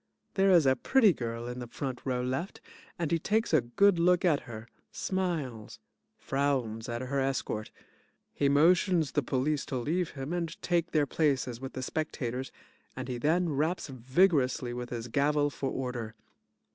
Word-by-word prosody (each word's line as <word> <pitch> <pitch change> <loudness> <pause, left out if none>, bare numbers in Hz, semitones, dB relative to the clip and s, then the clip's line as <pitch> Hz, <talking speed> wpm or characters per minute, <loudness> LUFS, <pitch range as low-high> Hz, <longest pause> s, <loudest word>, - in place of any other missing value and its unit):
There 195 0 +3
is 175 -5 +6
a 130 0 +5
PRETTY 225 - +4
GIRL 115 -2 -4
in 125 0 -5
the 120 - -6
front 130 +1 -5
row 125 -2 -1
left, 130 +9 -3 0.4
and 170 -4 -2
he 165 - +2
takes 215 +3 0
a 155 - +6
good 175 +10 +3
look 180 +2 +3
at 155 -5 +4
her, 110 0 -8 0.2
smiles, 160 - -3 0.4
frowns 130 -6 -1
at 120 +1 -3
her 135 +2 -1
escort. 135 -5 -2 0.6
He 140 - +1
motions 165 +1 +4
the 145 - +1
police 140 +3 0
to 130 - -2
leave 165 +8 -1
him 135 +5 -4
and 170 -2 -3
take 170 -1 +1
their 150 -2 +2
places 135 -5 0
with 135 - -6
the 130 - -4
spectators 130 -3 -3 0.4
and - - -5
he 125 -1 -3
then 170 +6 +2
raps 155 +4 -1
vigorously 130 -1 +2
with 120 0 -5
his 120 -1 -5
gavel 145 +3 +1
for 135 - -3
order. 120 -4 -4
140 Hz, 170 wpm, -30 LUFS, 125-170 Hz, 0.6 s, is